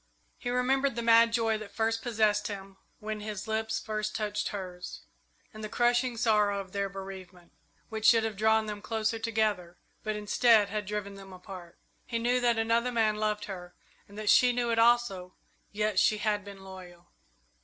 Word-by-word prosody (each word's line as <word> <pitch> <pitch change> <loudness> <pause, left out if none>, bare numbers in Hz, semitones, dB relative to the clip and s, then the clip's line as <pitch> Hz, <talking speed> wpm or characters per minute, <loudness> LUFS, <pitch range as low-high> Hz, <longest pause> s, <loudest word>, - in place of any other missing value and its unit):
He 245 - -4
remembered 265 +1 +1
the 235 - -3
mad 230 0 +6
joy 225 -2 +1
that 215 -1 -10
possessed 220 -2 +1
him 195 -2 -8 0.2
when 215 0 -5
his 210 -1 -6
lips 220 0 -1
first 215 -1 -3
touched 210 -1 -2
hers, 185 -3 -7 0.5
and 215 0 -9
the 215 - -4
crushing 240 +1 +1
sorrow 210 -3 +2
of 190 -2 -8
their 200 0 -2
bereavement, 190 -2 -10 0.4
which 220 0 0
should 225 -2 +6
have 220 -2 -2
drawn 220 +1 +3
them 210 -1 -6
closer 220 0 -1
together, 215 -6 -1 0.2
but 215 -1 -3
instead 210 0 +3
had 210 0 -3
driven 205 -1 -4
them 195 -1 -12
apart. 180 -2 -11 0.3
He 235 - -2
knew 245 +2 +1
that 240 -1 +2
another 230 +2 +1
man 220 -3 +1
loved 210 -1 -1
her 180 -3 -8 0.3
and 200 - -13
that 215 -1 +2
she 250 -1 +6
knew 240 -1 0
it 230 - +1
also, 225 -6 +2 0.4
yet 210 -1 0
she 215 - +3
had 210 -1 0
been 200 -1 -11
loyal. 180 -2 -12
215 Hz, 175 wpm, -29 LUFS, 200-230 Hz, 0.5 s, mad